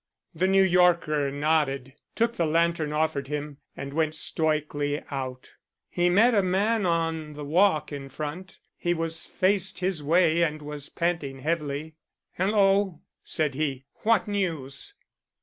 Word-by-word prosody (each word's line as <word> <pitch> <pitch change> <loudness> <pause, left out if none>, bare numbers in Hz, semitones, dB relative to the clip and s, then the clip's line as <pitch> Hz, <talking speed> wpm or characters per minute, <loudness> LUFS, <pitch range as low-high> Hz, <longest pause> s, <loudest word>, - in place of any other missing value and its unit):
The 175 +3 +1
New 195 0 +5
Yorker 170 -5 +3
nodded, 140 -2 0 0.2
took 235 +1 +1
the 170 - +1
lantern 165 -1 +1
offered 150 -3 0
him, 150 0 -4 0.2
and 140 0 -6
went 155 0 0
stoically 150 -2 -1
out. 130 -2 -5 0.4
He 175 0 +2
met 220 +7 +5
a 205 - +4
man 200 +3 +1
on 165 -2 -1
the 150 0 -7
walk 160 +1 +2
in 140 -1 -6
front. 155 +7 -6 0.2
He 175 -1 -1
was 165 0 -2
faced 190 0 +1
his 180 -3 -1
way 165 +2 +3
and 155 -2 +1
was 150 -1 -6
panting 160 -6 -2
heavily. 155 0 -3 0.4
"Hello," 195 -2 +2 0.2
said 150 -3 0
he, 135 -2 -2 0.2
"what 225 0 +2
news?" 165 -10 -3
160 Hz, 140 wpm, -26 LUFS, 145-180 Hz, 0.4 s, New